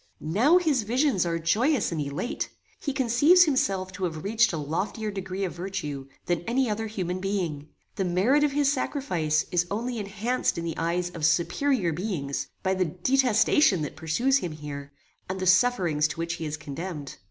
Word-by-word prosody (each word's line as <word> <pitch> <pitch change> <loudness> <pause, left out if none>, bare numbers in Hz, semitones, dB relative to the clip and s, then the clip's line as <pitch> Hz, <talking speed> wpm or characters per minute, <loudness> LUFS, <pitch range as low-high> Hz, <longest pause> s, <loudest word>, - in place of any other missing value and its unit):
"Now 280 - +5
his 310 -8 +2
visions 230 - +1
are 165 0 0
joyous 215 - +1
and 160 -2 -2
elate. 145 - -3 0.3
He 285 - -2
conceives 280 +7 +5
himself 195 - 0
to 190 0 -3
have 160 -3 -4
reached 225 +3 +3
a 165 - -3
loftier 195 +9 -3
degree 195 0 -4
of 185 - -2
virtue, 170 -7 -5 0.2
than 175 -1 0
any 255 +2 +2
other 220 +1 -2
human 185 -4 -3
being. 180 -7 -2 0.3
The 195 - +1
merit 195 +12 +3
of 295 - +2
his 285 -1 +3
sacrifice 175 - 0
is 175 0 +1
only 235 +3 -2
enhanced 215 +4 -1
in 170 - -3
the 165 - -2
eyes 175 +2 -1
of 165 -3 -8
superior 175 - +2
beings, 160 -6 -3 0.2
by 190 - +2
the 185 -1 +1
detestation 220 - +3
that 150 - -5
pursues 240 - +1
him 175 - -4
here, 140 -2 -7 0.4
and 190 0 -3
the 185 - -2
sufferings 185 -6 +3
to - - -7
which 165 0 -2
he 160 - -4
is 150 +1 -4
condemned. 150 0 -6
190 Hz, 180 wpm, -26 LUFS, 165-240 Hz, 0.4 s, Now